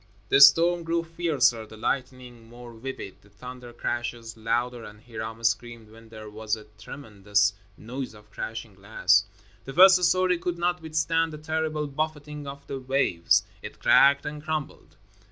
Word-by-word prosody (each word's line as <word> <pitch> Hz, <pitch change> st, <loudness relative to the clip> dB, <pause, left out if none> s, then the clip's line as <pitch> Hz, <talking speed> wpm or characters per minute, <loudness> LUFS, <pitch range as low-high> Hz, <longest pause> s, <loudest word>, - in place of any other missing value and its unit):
The 140 Hz, -, +5 dB
storm 170 Hz, +5 st, +7 dB
grew 165 Hz, 0 st, -1 dB
fiercer, 160 Hz, -9 st, 0 dB
the 110 Hz, -, -13 dB
lightning 125 Hz, -1 st, -4 dB
more 120 Hz, 0 st, -12 dB
vivid, 115 Hz, -4 st, -8 dB
the 100 Hz, -, -22 dB
thunder 125 Hz, +4 st, -11 dB
crashes 120 Hz, -1 st, -4 dB
louder, 120 Hz, +2 st, -2 dB
and 105 Hz, -1 st, -12 dB
Hiram 110 Hz, -1 st, -7 dB
screamed 115 Hz, -1 st, -2 dB
when 115 Hz, 0 st, -16 dB
there 110 Hz, -1 st, -10 dB
was 110 Hz, +1 st, -3 dB
a 110 Hz, -, -12 dB, 0.2 s
tremendous 105 Hz, -5 st, -1 dB, 0.2 s
noise 125 Hz, +1 st, -7 dB
of 105 Hz, 0 st, -18 dB
crashing 110 Hz, -1 st, -6 dB
glass. 100 Hz, +1 st, +2 dB, 0.4 s
The 135 Hz, -, -7 dB
first 185 Hz, +2 st, +7 dB
story 180 Hz, 0 st, +3 dB
could 175 Hz, 0 st, -3 dB
not 175 Hz, 0 st, -1 dB
withstand 160 Hz, +1 st, 0 dB
the -, -, -6 dB
terrible 155 Hz, 0 st, -2 dB
buffeting 150 Hz, 0 st, -4 dB
of 140 Hz, 0 st, -9 dB
the 135 Hz, -, -5 dB
waves. 130 Hz, -10 st, +2 dB, 0.2 s
It -, -, -9 dB
cracked 140 Hz, 0 st, +5 dB
and 150 Hz, 0 st, -5 dB
crumbled. 155 Hz, -2 st, -5 dB
125 Hz, 155 wpm, -26 LUFS, 110-155 Hz, 0.4 s, storm